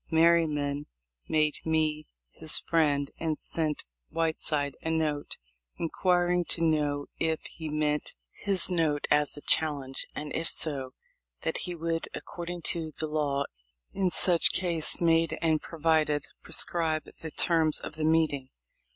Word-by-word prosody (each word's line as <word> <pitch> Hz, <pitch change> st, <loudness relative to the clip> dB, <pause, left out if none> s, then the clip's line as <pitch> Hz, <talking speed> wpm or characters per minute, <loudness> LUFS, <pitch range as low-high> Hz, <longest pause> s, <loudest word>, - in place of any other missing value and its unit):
Merryman 155 Hz, -3 st, +2 dB, 0.4 s
made 155 Hz, -1 st, +2 dB
me 155 Hz, -1 st, 0 dB, 0.2 s
his -, -, +3 dB
friend, 145 Hz, -4 st, +1 dB
and 160 Hz, -2 st, -1 dB
sent 155 Hz, -3 st, -2 dB, 0.2 s
Whiteside 155 Hz, -3 st, -1 dB
a 160 Hz, -, -3 dB
note, 155 Hz, -3 st, -1 dB, 0.4 s
inquiring 175 Hz, +1 st, +1 dB
to 165 Hz, -, -1 dB
know 145 Hz, -2 st, +1 dB
if 160 Hz, -1 st, 0 dB
he 160 Hz, -1 st, -7 dB
meant 150 Hz, 0 st, -1 dB, 0.2 s
his 195 Hz, -2 st, +1 dB
note 160 Hz, -4 st, +1 dB
as 150 Hz, 0 st, +3 dB
a -, -, -7 dB
challenge, 140 Hz, -4 st, +3 dB
and 150 Hz, 0 st, -5 dB
if 165 Hz, -, 0 dB
so, 135 Hz, -5 st, -1 dB, 0.5 s
that -, -, -1 dB
he 175 Hz, -, -4 dB
would, 165 Hz, 0 st, -2 dB
according 175 Hz, 0 st, -7 dB
to 165 Hz, -2 st, 0 dB
the 155 Hz, -, 0 dB
law 150 Hz, -2 st, 0 dB, 0.5 s
in 190 Hz, -2 st, +1 dB
such 175 Hz, 0 st, +4 dB
case 170 Hz, -4 st, +1 dB
made 165 Hz, -1 st, +2 dB
and 160 Hz, -2 st, +1 dB
provided, 155 Hz, -2 st, +1 dB, 0.2 s
prescribe 160 Hz, -2 st, 0 dB, 0.2 s
the 160 Hz, -, -5 dB
terms 160 Hz, -1 st, +3 dB
of -, -, -7 dB
the 155 Hz, 0 st, -4 dB
meeting. 155 Hz, -4 st, +1 dB
160 Hz, 135 wpm, -28 LUFS, 150-165 Hz, 0.5 s, such